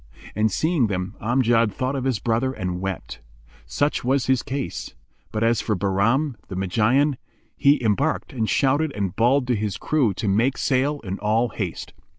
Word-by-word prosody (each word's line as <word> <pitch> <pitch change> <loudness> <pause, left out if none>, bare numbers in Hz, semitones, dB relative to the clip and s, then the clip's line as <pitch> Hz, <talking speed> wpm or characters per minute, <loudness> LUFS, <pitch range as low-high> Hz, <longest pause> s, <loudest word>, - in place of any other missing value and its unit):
And 110 +1 +1
seeing 155 - +1
them 90 -2 -3
Amjad 115 -1 +2
thought 130 +7 -2
of 135 -1 -3
his 130 -4 +1
brother 120 +5 0
and 90 -5 -4
wept. 95 -8 -5 0.5
Such 145 +1 0
was 130 +1 +1
his 130 -2 +2
case; 140 -1 -5 0.4
but 110 0 -1
as 115 0 +2
for 110 - -1
Bahram, 110 - +1
the 95 - -6
Magian, 115 +10 +2 0.4
he 140 +1 +4
embarked 135 +10 0
and 110 -4 -1
shouted 145 +3 +2
and 100 -3 -2
bawled 125 +4 +3
to 125 -1 +1
his 105 -2 -2
crew 130 - +1
to 110 - -3
make 115 +7 +2
sail 140 +2 0
in 95 -2 -5
all 110 +3 +1
haste. 95 -5 -5
120 Hz, 170 wpm, -23 LUFS, 105-135 Hz, 0.5 s, he